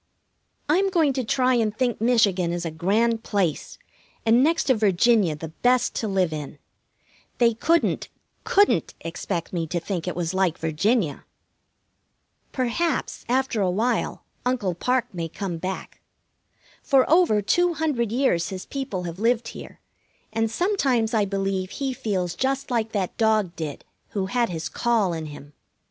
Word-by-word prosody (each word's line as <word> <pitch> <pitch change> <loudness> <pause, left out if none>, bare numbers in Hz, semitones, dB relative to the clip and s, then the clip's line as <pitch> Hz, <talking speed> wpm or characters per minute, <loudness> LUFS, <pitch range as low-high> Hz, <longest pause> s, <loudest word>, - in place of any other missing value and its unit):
I'm 375 +6 +3
going 325 -7 +2
to 260 -1 -1
try 255 +2 +2
and 220 -3 +1
think 245 -3 0
Michigan 205 -7 +3
is 175 0 -3
a 165 - -2
grand 220 +8 +1
place, 190 -9 -1 0.5
and 230 +3 +5
next 325 +3 +2
to 260 - +3
Virginia 210 -4 +3
the 160 +1 -7
best 245 +9 +1
to 220 - -1
live 190 -5 +1
in. 150 -1 -6 0.8
They 235 -1 +4
couldn't, 330 +9 +1 0.3
couldn't 405 +1 +2
expect 170 +1 -4
me 165 -2 -1
to 175 +2 -1
think 180 0 -4
it 180 - -2
was 175 0 -2
like 185 -3 +1
Virginia! 165 - 0 1.3
Perhaps, 260 +7 -1
after 255 -3 +1
a 190 - +2
while, 220 +7 -1 0.2
Uncle 240 -7 0
Parke 250 +7 -1
may 165 -2 -4
come 175 -1 -4
back. 185 +2 -6 0.8
For 270 -3 +3
over 330 -10 +4
two 350 - +2
hundred 270 -9 0
years 230 -10 +1
his 185 -1 -6
people 265 -10 -4
have 170 +1 -6
lived 235 +1 +1
here, - - -11 0.5
and 225 0 +1
sometimes 260 - +1
I 215 -2 +3
believe 195 -1 -2
he 270 +5 -3
feels 185 -7 -2
just 270 0 -1
like 225 -2 0
that 195 -4 -2
dog 215 -6 +2
did 155 -3 -6 0.3
who 190 - +1
had 235 +3 0
his 165 -2 -4
call 225 -5 +1
in 160 -1 -4
him. 145 0 -11
215 Hz, 155 wpm, -24 LUFS, 180-250 Hz, 1.3 s, and